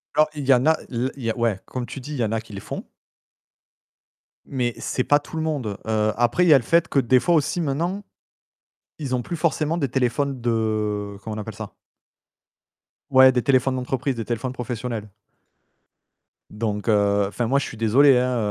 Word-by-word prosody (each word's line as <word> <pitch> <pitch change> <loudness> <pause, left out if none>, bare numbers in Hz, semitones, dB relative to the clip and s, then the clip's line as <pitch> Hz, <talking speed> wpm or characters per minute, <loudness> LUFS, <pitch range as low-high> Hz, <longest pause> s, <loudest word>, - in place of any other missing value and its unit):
Alors, 155 0 +4
il 145 -2 -4
y 135 - +7
en 125 +3 +2
a 160 - +4
l 125 +2 -1
il 135 - -10
y 115 - 0
a - - -6
ouais, 115 -5 0
comme 125 -1 -5
tu 135 - -7
dis, 140 +4 -9
il 145 - -4
y - - +2
en 105 - -3
a 115 - 0
qui 110 -1 -15
le 100 - -5
font - - -6 1.6
mais 125 -3 -2
c'est 130 - -1
pas 145 +3 +4
tout 150 - -9
le 160 - -1
monde. 130 -11 -2
Heu, 110 -1 +1
après, 120 +9 +2
il - - +3
y - - +9
a - - +8
le 125 - -2
fait 170 +8 +3
que, 140 - +1
des 130 0 +4
fois, 175 +6 +2
aussi, 160 +3 +1
maintenant, 170 +7 -2 1.0
ils 140 -5 -3
ont 125 - 0
plus 170 - -5
forcément 160 0 0
des 140 -4 0
téléphones 130 +1 -1
de, 110 -3 -1
comment 110 -1 -5
on 110 - -4
appelle - - -7
ça? - - -8 1.4
Ouais, 130 -1 +7
des 125 -1 0
téléphones 130 -1 +2
d'entreprise, 130 +1 -2
des 115 - -4
téléphones 120 +2 -3
professionnels. 120 -3 -5 1.4
Donc, 105 -1 -3
heu, 100 -2 +3
enfin, 115 +3 -2
moi, 135 - +2
je - - -3
suis 115 - -8
désolé, 125 +5 +5
hein, 125 0 +1
125 Hz, 210 wpm, -23 LUFS, 115-140 Hz, 1.6 s, y